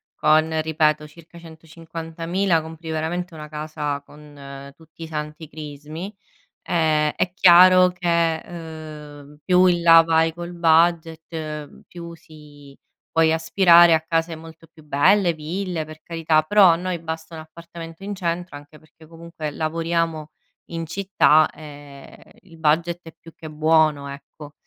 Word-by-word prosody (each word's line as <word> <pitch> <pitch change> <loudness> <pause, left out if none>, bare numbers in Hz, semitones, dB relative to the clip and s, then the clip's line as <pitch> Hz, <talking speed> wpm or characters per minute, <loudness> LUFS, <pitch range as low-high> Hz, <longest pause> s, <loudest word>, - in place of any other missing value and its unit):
con, 155 +1 +2
ripeto, 155 -1 0
circa 170 +2 -17
150000, 165 +2 -4
compri 160 +1 -10
veramente 165 +2 -3
una 150 -1 -10
casa 150 -2 -5
con 140 -2 -12
tutti 165 0 -14
i - - -7
santi 150 0 -7
crismi, 155 +6 -9 0.5
ehm, 155 -3 +1
è 180 - -2
chiaro 185 0 +7
che, 170 -2 0
ehm, 150 -3 -11
più 185 0 +4
in 175 -1 +1
là 165 -1 +8
vai 165 0 +1
col 175 +1 -8
budget, 160 -2 -1
più 170 -1 -10
si 150 -3 -16 0.3
puoi 160 -1 +2
aspirare 170 +1 +5
a 160 - +2
case 165 0 -2
molto 165 0 -14
più 155 -1 -20
belle, 175 +6 +3
ville, 165 +1 -4
per 155 0 -13
carità. 165 -2 +1
Però 205 +4 +5
a - - +2
noi 180 0 -4
basta 160 0 -7
un 160 - -8
appartamento 165 +2 -12
in 205 +1 -5
centro, 175 -3 -4
anche 145 +1 -16
perché 155 0 -21
comunque 165 -2 -8
lavoriamo 165 0 -2 0.3
in 165 -1 -6
città 165 -4 +2
e 145 -2 -14
il 165 -4 -17
budget 165 +2 0
è 165 - -11
più 165 - -15
che 155 - -10
buono, 155 -2 +1
ecco. 145 +1 -12
160 Hz, 140 wpm, -22 LUFS, 155-170 Hz, 0.5 s, là